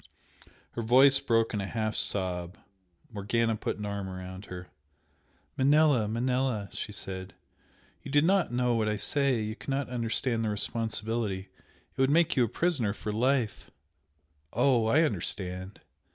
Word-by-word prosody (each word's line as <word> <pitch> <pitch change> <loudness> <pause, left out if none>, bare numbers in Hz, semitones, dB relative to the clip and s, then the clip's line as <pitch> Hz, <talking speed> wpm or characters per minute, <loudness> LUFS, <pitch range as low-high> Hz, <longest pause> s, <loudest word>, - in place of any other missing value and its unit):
Her 120 - -4
voice 135 +4 +6
broke 115 -2 +1
in 105 - -1
a 100 - -4
half 110 0 -2
sob. 90 -2 -2 0.6
Morgana 115 +3 0
put - - -3
an 105 - -5
arm 100 -1 -4
about 95 +1 -8
her. 90 -2 -8 0.9
"Manella, 140 -4 +4
Manella!" 120 -2 -1
she - - -5
said 95 -2 -6 0.7
"You - - -9
do 145 +1 +4
not 190 -2 +2
know 125 0 +1
what 110 -2 +1
you 105 0 0
say 135 +3 +1
you 110 0 -3
cannot 135 +1 -3
understand 115 -1 -1
the 110 - 0
responsibility 110 -2 -2 0.5
it - - -1
would 135 - +4
make 165 +3 +3
you 130 - +4
a - - +1
prisoner 130 - 0
for 105 - -4
life 120 +1 0 0.4
" 75 -1 -43
"Oh, 120 -1 +3
I 150 +8 +4
understand!" 95 - -4
115 Hz, 150 wpm, -29 LUFS, 100-130 Hz, 0.9 s, voice